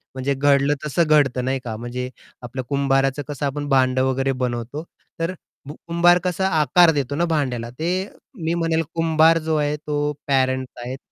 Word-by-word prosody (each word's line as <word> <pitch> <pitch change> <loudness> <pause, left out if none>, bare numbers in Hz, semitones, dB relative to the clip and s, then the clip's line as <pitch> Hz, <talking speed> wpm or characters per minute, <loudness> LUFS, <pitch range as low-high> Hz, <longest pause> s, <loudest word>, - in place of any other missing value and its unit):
म्हणजे 135 +1 -1
घडलं 140 +1 +3
तसं 160 +4 +1
घडतं 135 -5 +3
नाही 135 +1 0
का, 115 -3 -5
म्हणजे 125 +2 -5 0.3
आपल्या 125 +1 -6
कुंभाराचं 135 +1 +1
कसं 145 -1 -4
आपण 145 +1 -3
भांडं 130 -1 +3
वगैरे 135 +1 0
बनवतो 125 +4 -3 0.4
तर 165 +2 -1 0.3
भू 145 - -6
कुंभार 175 +1 +4
कसा 185 +1 0
आकार 165 +4 +5
देतो 140 -1 -2
ना 170 +3 +1
भांड्याला, 130 -8 -1
ते 175 +9 -2 0.4
मी 165 +1 0
म्हणेल 165 -1 +1
कुंभार 165 0 +4
जो 160 - +1
आहे, 150 -1 0
तो 150 0 -2
पॅरेंट्स 130 -2 0
आहेत. 130 +2 -5
140 Hz, 165 wpm, -22 LUFS, 130-160 Hz, 0.4 s, आकार